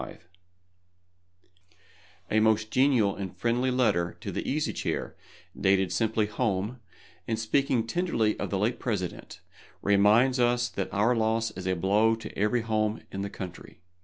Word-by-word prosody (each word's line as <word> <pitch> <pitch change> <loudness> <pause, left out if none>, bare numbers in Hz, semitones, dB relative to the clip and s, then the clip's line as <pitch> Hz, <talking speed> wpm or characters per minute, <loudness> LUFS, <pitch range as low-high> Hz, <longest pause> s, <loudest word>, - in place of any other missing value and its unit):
APRIL, - - -8 2.2
1865 110 - +2
A - - +2
most 110 0 +2
genial 125 -7 +3
and 95 -2 -6
friendly 120 +5 +1
letter 110 -9 +1
to - - -5
the - - -3
Easy - - -1
Chair, - - -3 0.4
dated 95 -1 +2
simply 110 -1 +1
"Home," 105 +1 -2 0.5
and 110 - -1
speaking 115 +1 +1
tenderly 115 -6 0
of - - -3
the 100 - -1
late 110 +5 0
President, 100 -7 -4 0.4
reminds 105 +6 +4
us 120 0 +2
that - - -4
our 110 +4 +2
loss 115 0 0
is 95 0 -7
a 95 - +1
blow 105 +5 +3
to 115 - -10
every 105 +4 +1
home 110 -1 -1
in 95 - -4
the 100 - -3
country. 90 -3 -9
110 Hz, 155 wpm, -27 LUFS, 100-120 Hz, 2.2 s, reminds